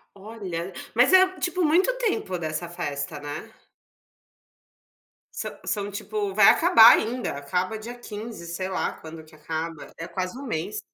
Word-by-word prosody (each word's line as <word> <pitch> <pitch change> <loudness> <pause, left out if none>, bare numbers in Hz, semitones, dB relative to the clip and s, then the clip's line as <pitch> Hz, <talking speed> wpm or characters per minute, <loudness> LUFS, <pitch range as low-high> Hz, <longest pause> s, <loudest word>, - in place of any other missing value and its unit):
Olha. 195 -4 -6 0.2
Mas 245 +8 +4
é, 375 0 +8
tipo, 360 0 0
muito 355 +9 +4
tempo 405 - -1
dessa 160 +1 -4
festa, 145 -2 -4
né? 145 +1 -7 1.9
Sã - - -3
são, 205 -1 -2
tipo, 205 0 -3
vai 210 -2 +7
acabar 325 -10 +8
ainda. 240 +3 -2
Acaba 180 +9 -2
dia 240 +3 -8
15, 215 -5 -8
sei 180 +3 -4
lá, 190 - -1
quando 160 0 -11
que 155 - -20
acaba. 160 +1 -5
É 165 - -6
quase 185 +5 -4
um 280 - -8
mês. 210 0 -3
195 Hz, 150 wpm, -25 LUFS, 165-230 Hz, 1.9 s, é